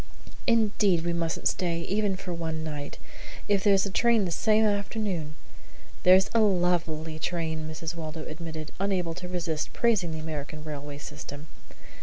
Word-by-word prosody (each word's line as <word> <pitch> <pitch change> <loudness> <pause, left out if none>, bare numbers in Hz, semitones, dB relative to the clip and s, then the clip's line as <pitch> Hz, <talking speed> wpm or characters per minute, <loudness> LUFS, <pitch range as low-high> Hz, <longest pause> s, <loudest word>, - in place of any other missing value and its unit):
"Indeed 210 -7 +3
we 170 - +1
mustn't 165 -1 0
stay, 170 -2 0
even 200 +2 0
for 185 -1 -5
one 160 -2 -3
night. 150 -2 -5 0.5
If 200 -2 +2
there's 200 -2 +5
a 200 - -3
train 230 0 +3
the 175 - -2
same 215 +5 +3
afternoon 200 -6 -1 0.3
" - - -21
"There's 185 +2 +6
a 230 - +4
lovely 175 -6 +1
train," 160 -1 -2
Mrs. 160 +1 -4
Waldo 160 -1 -6
admitted, 160 -1 -6
unable 185 -4 0
to 180 +2 -6
resist 170 -4 -2
praising 220 -7 +2
the 160 - -4
American 155 -1 -5
railway 145 -1 -6
system. 145 0 -8
170 Hz, 155 wpm, -28 LUFS, 155-195 Hz, 0.5 s, There's